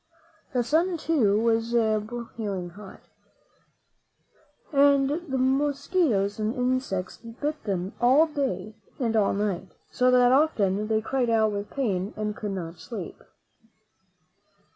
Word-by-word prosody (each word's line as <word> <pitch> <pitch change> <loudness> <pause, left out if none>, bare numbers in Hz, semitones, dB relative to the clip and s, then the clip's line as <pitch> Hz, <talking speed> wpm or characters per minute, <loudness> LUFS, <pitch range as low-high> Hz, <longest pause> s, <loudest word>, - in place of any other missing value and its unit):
The 250 -1 +1
sun, 335 +8 +1
too, 245 -11 +2
was 230 +1 +1
broiling 215 -4 -2
hot, 200 +2 -12 1.7
and 280 -1 +5
the 295 -1 -3
mos 270 +2 0
quitoes 220 - +1
and 215 +2 -1
insects 250 -7 -1
bit 290 +7 -5
them 190 -2 -2
all 265 +6 +6
day 260 - -3 0.3
and 230 -4 0
all 210 -3 +2
night, 195 -3 -3 0.2
so 250 0 +2
that 250 -1 +5
often 215 -9 +2
they 220 0 +1
cried 245 +1 -1
out 220 -1 +3
with 205 0 -4
pain 205 -7 -2
and 210 -1 -2
could 210 - -5
not 170 -3 -5
sleep. 190 +1 -8
230 Hz, 125 wpm, -26 LUFS, 205-270 Hz, 1.7 s, all